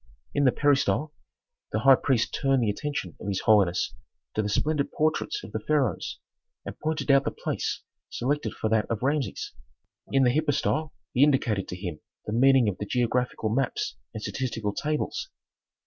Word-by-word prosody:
In 145 - +2
the 130 - +6
peristyle 145 +2 +2 0.6
the 110 - 0
high 135 +3 +8
priest 130 -3 +1
turned 135 -3 +2
the 105 - +2
attention 105 - -4
of - - -6
his 95 -2 -1
holiness 95 - +3 0.4
to 110 - +1
the 105 - -2
splendid 145 +7 0
portraits 155 - 0
of - - -9
the - - -2
pharaohs, 145 -7 0 0.5
and - - -7
pointed 155 -2 0
out 140 0 +5
the - - 0
place - - -3 0.3
selected 145 +4 -1
for - - -1
that 110 -1 +2
of 115 0 -2
Rameses. 135 -6 -1 0.6
In 135 -1 +4
the 125 -1 +4
hypostyle 155 +1 0 0.2
he 125 - +2
indicated 120 -9 +2
to - - -5
him 90 -4 -5 0.3
the 105 - -3
meaning 130 0 +5
of 100 -3 -2
the 105 - -4
geographical 125 -1 0
maps 125 +3 -1 0.2
and 110 - -7
statistical 115 -6 -2
tables. 150 +4 -2
130 Hz, 170 wpm, -27 LUFS, 110-145 Hz, 0.6 s, high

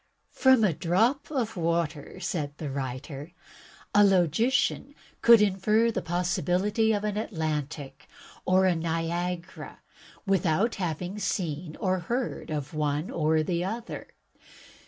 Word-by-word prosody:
"From 260 -4 +4
a 190 -6 +3
drop 220 - +1
of 245 -7 -2
water," 165 -1 -2
said 155 -6 -3
the 150 -4 -5
writer, 135 +4 -5 0.6
"a 205 - +6
logician 205 - +2 0.3
could 230 -2 +7
infer 210 +4 +2
the - - -2
possibility 180 +5 +1
of 205 -1 0
an 210 -1 -2
Atlantic 150 - -4 0.4
or 185 +1 +3
a 185 -2 +3
Niagara 170 +2 -3 0.4
without 195 +2 +2
having 180 +4 -3
seen 170 -5 -3
or 185 -1 0
heard 240 +8 -3
of 150 -2 -4
one 150 +1 -1
or 155 -1 +2
the 170 +1 -1
other. 225 +5 -5
180 Hz, 120 wpm, -27 LUFS, 160-210 Hz, 0.6 s, could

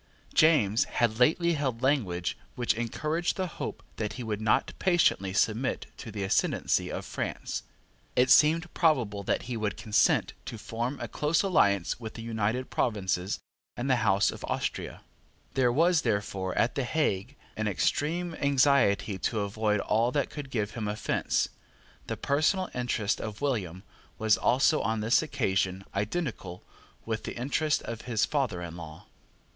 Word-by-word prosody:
James 140 -7 +4
had 115 -1 0
lately 170 +6 +4
held 130 -5 -2
language 100 -11 +1 0.2
which 120 -1 +1
encouraged 155 +9 -1
the 190 - 0
hope 175 - -6
that 105 -2 -2
he 125 - -6
would 110 -2 -3
not 110 - +2
patiently 170 - +2
submit 110 +6 0
to 115 - -8
the 100 -1 -4
ascendancy 95 - +1
of - - -4
France. - - -4 0.5
It 125 +1 +4
seemed 160 +3 +5
probable 120 - +2
that 100 - -1
he 120 0 -4
would 105 -3 -2
consent 105 -1 +2
to 115 - -6
form 120 +5 -4
a - - -4
close 150 +3 +1
alliance 100 - +2
with 110 -2 -7
the 115 - -7
United 115 +2 -1
Provinces 95 -4 0 0.4
and 120 - -2
the 130 -2 +3
House 105 -3 +3
of - - -10
Austria. - - -3 0.5
There 130 -2 +3
was, 165 +5 +3
therefore, 100 -4 -2
at 115 - +2
the 135 - -1
Hague, 125 -4 -1 0.2
an 110 0 -1
extreme 165 - 0
anxiety 130 -9 +3
to 110 +2 -1
avoid 105 0 0
all 115 +3 +1
that 145 - 0
could 145 -3 -7
give 105 -5 -2
him 110 -3 -4
offence. 105 +1 0 0.6
The - - -3
personal 155 +7 +1
interest 120 -4 -1
of 110 -1 -6
William 100 - -2 0.3
was 110 -1 +4
also 135 +5 +3
on 110 +1 -1
this 110 +3 +4
occasion 95 - -1
identical 105 - -3 0.4
with 110 -1 -3
the - - -6
interest 145 +4 0
of 115 -1 -5
his 110 -3 +2
father 125 -12 -1
in 85 -1 -7
law. 80 -2 -10
115 Hz, 155 wpm, -28 LUFS, 105-140 Hz, 0.6 s, seemed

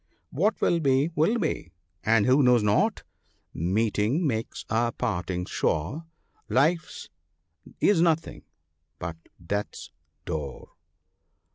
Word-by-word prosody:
V - - -42 0.2
What 210 +3 +2
will 170 - +3
be, 140 +1 +2
will 165 +10 +2
be; 155 - -3 0.3
and 110 -1 +3
who 130 +3 +5
knows 125 -4 +4
not 105 0 +2 0.2
— - - -40
" - - -50
Meeting 110 - 0
makes 115 -5 -3
a 115 +2 +1
parting 90 -6 -2
sure, 95 - -2 0.4
Life's 150 +9 +1 0.7
is 200 -5 +4
nothing 165 -1 +1 0.6
but 85 -1 -5 0.3
death's 100 +2 -4 0.3
door." 75 -5 -5
120 Hz, 120 wpm, -26 LUFS, 100-160 Hz, 0.7 s, who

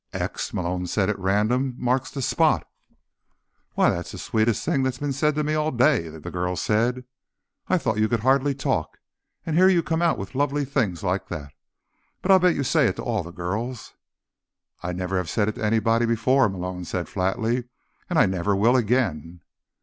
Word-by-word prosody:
"X," - - -3
Malone 90 0 -2
said 100 +2 +1
at 100 - -6
random, 110 +7 +1
"marks 125 +1 0
the 135 -2 -5
spot." - - +2 1.1
"Why, - - +4
that's - - -4
the - - -7
sweetest 110 0 0
thing 135 - +1
that's 130 -1 -1
been 145 -1 -2
said 150 +2 +1
to 150 - 0
me 150 +1 -1
all 155 0 +1
day," 125 - +2
the 80 -1 -9
girl 90 0 -2
said. 120 +6 0 0.6
"I 185 - +3
thought 110 -10 -1
you 110 0 +2
could 115 -3 0
hardly 135 +3 +2
talk, 135 - -2 0.5
and 160 - -2
here 185 +3 +6
you 175 -3 +3
come 160 +1 -1
out 170 -1 +2
with 95 - -7
lovely 145 +1 0
things 120 - -1
like 95 +1 -1
that. 70 -2 -7 0.7
But 195 - +2
I'll 190 - +8
bet 180 -1 +3
you 140 - -1
say 140 0 +3
it - - -1
to - - -6
all 115 -4 -1
the 85 - -9
girls." 105 +8 -4 0.9
"I 90 - -5
have 90 - -3
never 90 0 -1
said 105 +6 0
it - - -3
to 120 - -7
anybody 115 +2 +2
before," 125 +2 +3
Malone 90 -1 -5
said 90 0 -4
flatly. 110 +6 -1 0.4
"And - - 0
I - - +6
never 95 +2 0
will 115 +6 +3
again." 100 - 0
115 Hz, 195 wpm, -24 LUFS, 95-135 Hz, 1.1 s, I'll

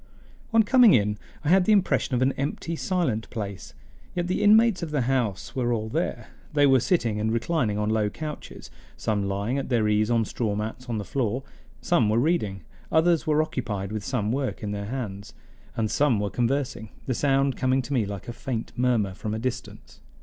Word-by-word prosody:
On 225 0 +5
coming 240 -1 +6
in 105 -2 +1 0.2
I 150 - 0
had 185 +1 +5
the 220 - +3
impression 190 -9 +2
of 125 - +2
an 135 - +3
empty, 150 +4 -3
silent 160 - -1
place; 100 -5 -6 0.4
yet 175 -1 0
the 180 +1 -1
inmates 215 -1 +5
of 170 - -3
the 150 -2 0
house 120 -6 -1
were 120 -2 0
all 110 -2 -1
there; - - -2 0.2
they 145 -1 +4
were 135 -1 +5
sitting 115 - +1
and 110 +1 0
reclining 115 -2 0
on 105 0 -1
low 110 -1 +1
couches, 150 +6 -8 0.3
some 105 -2 -1
lying 100 +7 -1
at 135 - -5
their 115 -4 +2
ease 105 +1 +2
on 115 -2 +2
straw 105 -1 -2
mats 110 +4 -5
on 115 - -1
the 105 - -4
floor; 125 +1 -1 0.4
some 105 - +2
were 110 - +2
reading, 115 - 0 0.3
others 165 0 +3
were 155 0 +3
occupied 105 -9 -4
with 110 -1 -4
some 110 -4 -1
work 130 -2 -2
in 105 - -2
their 100 0 -4
hands, 110 -3 -5 0.4
and 110 -2 0
some 140 -7 +2
were 105 -1 -2
conversing, 125 -3 -1 0.2
the 130 - 0
sound 135 +1 +2
coming 130 0 +1
to 125 - -5
me 125 -5 +2
like 100 -1 -6
a 120 - -5
faint 120 -2 -4
murmur 120 -6 +1
from 105 +3 -4
a - - -2
distance. 130 +1 -6
120 Hz, 200 wpm, -26 LUFS, 105-145 Hz, 0.4 s, coming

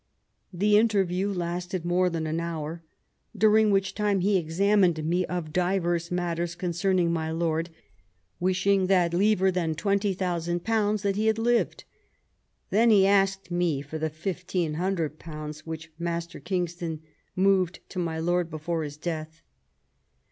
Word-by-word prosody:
The 205 +3 +4
interview 195 -3 +1
lasted 175 -1 -3
more 180 +1 +2
than 165 -2 -3
an 160 +1 -1
hour, 165 -1 -4 0.6
"during 215 +1 +5
which 195 -1 +1
time 205 -2 +1
he 200 +2 +2
examined 180 0 +2
me 175 +2 +1
of 170 -4 -4
divers 175 -2 0
matters 175 -1 -2
concerning 175 0 0
my 160 -1 -2
lord, 165 0 -1 0.7
wishing 185 +1 +2
that 180 -3 +3
liever 190 0 +3
than 170 -3 -1
twenty 200 +3 0
thousand 175 -2 -2
pounds 215 -2 +1
that 200 -1 0
he 215 +1 +1
had 220 0 +2
lived. 235 +1 +1 0.9
Then 230 +3 +4
he 200 -3 +6
asked 195 -2 +2
me 175 -5 0
for 155 +2 -6
the 160 0 -1
fifteen 175 0 -3
hundred 165 -2 -2
pounds 155 -1 -8
which 160 -1 -6
Master 170 0 -3
Kingston 175 -4 -3 0.3
moved 185 -2 +1
to 185 - -5
my 165 -2 -2
lord 175 +1 0
before 160 +1 -3
his 145 -1 -6
death." 160 0 -5
175 Hz, 145 wpm, -27 LUFS, 165-195 Hz, 0.9 s, he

